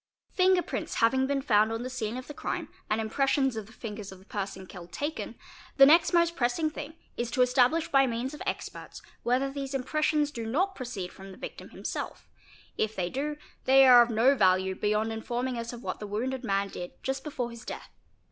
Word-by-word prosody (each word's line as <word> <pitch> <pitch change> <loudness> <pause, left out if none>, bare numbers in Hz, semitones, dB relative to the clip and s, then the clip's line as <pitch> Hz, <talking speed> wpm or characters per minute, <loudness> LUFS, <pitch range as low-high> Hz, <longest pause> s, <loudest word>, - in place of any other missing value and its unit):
Finger 370 -1 +4
prints - - -4
having 260 +3 +3
been 275 -1 0
found 215 -4 +4
on 225 +1 -3
the - - -3
scene 235 -2 -3
of 255 - -6
the 295 - -8
crime - - -4 0.2
and 215 - +1
im 220 - -1
pressions 270 +1 +1
of 220 -2 -5
the - - -15
fingers 210 -4 -7
of 190 - -10
the 190 - -19
person 195 -2 -5
killed 180 -2 -11
taken, 295 +2 -4 0.4
the 275 - +10
next 325 +4 +6
most 340 -1 +3
pressing 265 +4 +1
thing 300 +1 -7 0.2
is 240 -1 -1
to 250 +1 +3
establish 255 +6 +3
by 270 -1 +4
means 245 +3 -2
of 300 - -9
experts - - -5 0.2
whether 260 +3 +1
these 275 0 -4
impressions 300 +2 +1
do 230 -5 -5
not 365 - +1
proceed 240 - -6
from 195 0 -11
the 185 - -12
victim - - -8
himself; - - -5 0.5
if 220 0 0
they 175 -1 -2
do, 295 +2 -2 0.3
they 270 +1 +7
are 245 -1 +10
of 240 - +3
no 235 +4 +4
value 190 -5 +3
beyond 210 +3 0
in 220 - -5
forming 245 +2 -2
us 230 0 -4
of 240 -1 -9
what - - -4
the 210 - -6
wounded 250 +6 -2
man 200 -3 +1
did 175 -2 -7
just 265 0 -2
before 250 -5 -3
his 235 0 -10
death. - - -7
245 Hz, 215 wpm, -29 LUFS, 215-275 Hz, 0.5 s, the